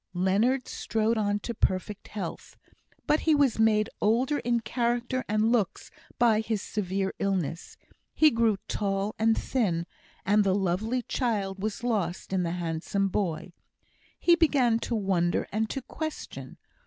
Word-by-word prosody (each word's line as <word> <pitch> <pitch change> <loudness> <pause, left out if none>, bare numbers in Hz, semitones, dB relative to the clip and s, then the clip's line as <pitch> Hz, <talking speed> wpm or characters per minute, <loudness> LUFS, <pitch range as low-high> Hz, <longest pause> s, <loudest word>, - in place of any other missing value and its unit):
Leonard 210 +9 +2
strode 225 +1 0
on 205 -2 +1
to 235 +3 -5
perfect 200 -1 -1
health; 195 -6 -7 0.5
but 300 - +3
he 315 -2 +3
was 280 -6 +2
made 215 -1 +4
older 250 +7 +2
in 240 -1 +1
character 240 +3 -1
and 215 +2 +2
looks 220 -7 0 0.3
by 230 -3 +4
his 220 -1 -2
severe 195 -1 -2
illness. 180 -4 -2 0.4
He 310 -1 +6
grew 230 -4 +2
tall 200 0 -1
and 225 0 +3
thin, 180 -10 0 0.4
and 205 +1 +4
the 190 -1 +2
lovely 205 +6 0
child 200 -8 -2
was 215 +2 -3
lost 195 -7 -2
in 190 - +2
the 170 -1 -1
handsome 175 +3 -1
boy. 175 -3 -2 0.6
He 345 - +5
began 270 -9 +3
to 235 - 0
wonder, 185 -5 +1
and 220 +1 -1
to 270 - -4
question. 315 +3 -6
215 Hz, 145 wpm, -28 LUFS, 195-235 Hz, 0.6 s, He